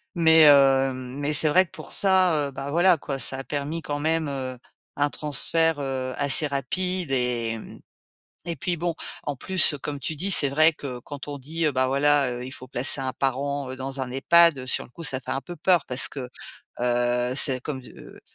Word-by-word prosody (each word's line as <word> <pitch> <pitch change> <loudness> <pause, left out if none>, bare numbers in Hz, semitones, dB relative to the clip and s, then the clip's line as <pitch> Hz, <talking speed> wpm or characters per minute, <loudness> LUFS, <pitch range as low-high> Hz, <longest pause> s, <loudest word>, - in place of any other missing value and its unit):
mais 160 -2 +5
heu, 135 -2 +4
mais 130 +3 -5
c'est 150 +2 +4
vrai 185 +5 +4
que - - -33
pour - - -10
ça, 190 -3 +4
heu, - - -8
bah 135 +1 -7
voilà 175 +3 +3
quoi, 140 -1 -6
ça 130 +1 -1
a 135 - -7
permis 150 +4 -4
quand 145 -1 -4
même, 160 0 -1
heu, 130 -2 -6 0.4
un 145 0 0
transfert, 160 +2 +3
heu, 130 -2 -4
assez 140 +2 +2
rapide 175 +5 -3
et 120 -3 -2 0.9
et 170 -1 -4
puis 175 -2 -3
bon, 170 0 -3 0.3
en 145 - -4
plus, 185 +2 +3
comme 145 -1 -5
tu 155 +3 -5
dis, 185 +7 -3
c'est 145 -6 +6
vrai 155 +4 +3
que 130 -5 -8
quand 145 +3 -10
on 145 - -6
dit, 160 +5 -4
bah 130 0 0
voilà, 140 0 +1
heu, 125 0 -6
il 130 - -10
faut 130 -1 -11
placer 130 +3 +1
un 130 -1 -3
parent 135 +1 -3
dans 135 +1 -5
un 130 -1 -5
EHPAD, 145 +1 +3
sur 130 - -1
le - - -18
coup, 170 - -12
ça 135 -4 0
fait - - -9
un 135 - -3
peu 175 +4 -10
peur 175 +1 +1
parce 125 0 +4
que, 130 -3 -8 0.5
heu, 120 0 0
c'est 130 -2 +6
comme, 135 -2 -6
heu, - - -15
140 Hz, 205 wpm, -23 LUFS, 130-160 Hz, 0.9 s, c'est